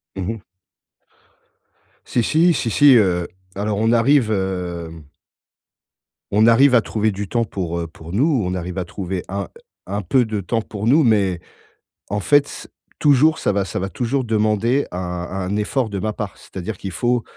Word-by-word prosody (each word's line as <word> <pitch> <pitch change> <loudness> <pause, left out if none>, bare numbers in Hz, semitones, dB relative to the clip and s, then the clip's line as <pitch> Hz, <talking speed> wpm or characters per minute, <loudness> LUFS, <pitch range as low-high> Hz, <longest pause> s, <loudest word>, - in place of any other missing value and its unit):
Mmh 95 - -4
mh. 115 - -9 1.7
Si 120 - 0
si, 165 +7 +3
si 115 - -1
si, 140 +4 +6
heu, 90 -5 +2 0.3
alors 105 +1 -2
on 110 +1 +2
arrive, 120 0 +3
hem 90 -5 -3 1.3
on 105 +2 +4
arrive 125 +3 +6
à 115 - +6
trouver 110 0 -1
du 100 0 -5
temps 120 -1 0
pour, 85 -5 -4
heu, 85 - -3
pour 80 0 -12
nous. 135 - +2
On 90 - -2
arrive 90 +1 -5
à 90 - -2
trouver 95 0 -5
un 100 -1 -3 0.4
un 100 +2 -2
peu 120 +7 +2
de 110 -2 -3
temps 115 +5 -1
pour 105 -1 -6
nous, 145 +6 +4
mais, 100 -6 +2 0.7
en 105 +1 -2
fait, 145 +6 +4
c'est - - -9 0.3
toujours 150 +2 +4
ça - - +1
va 100 -1 0
ça - - -5
va 95 +1 -3
toujours 125 +7 -1
demander 110 +4 +1
un - - -4
un 90 +2 -4
effort 110 +3 -1
de 100 -2 -4
ma 110 +1 -2
part. 105 -2 -6
C'est-à-dire 95 +2 -7
qu'il 95 - -6
faut, 120 -1 0
105 Hz, 180 wpm, -20 LUFS, 95-120 Hz, 1.7 s, si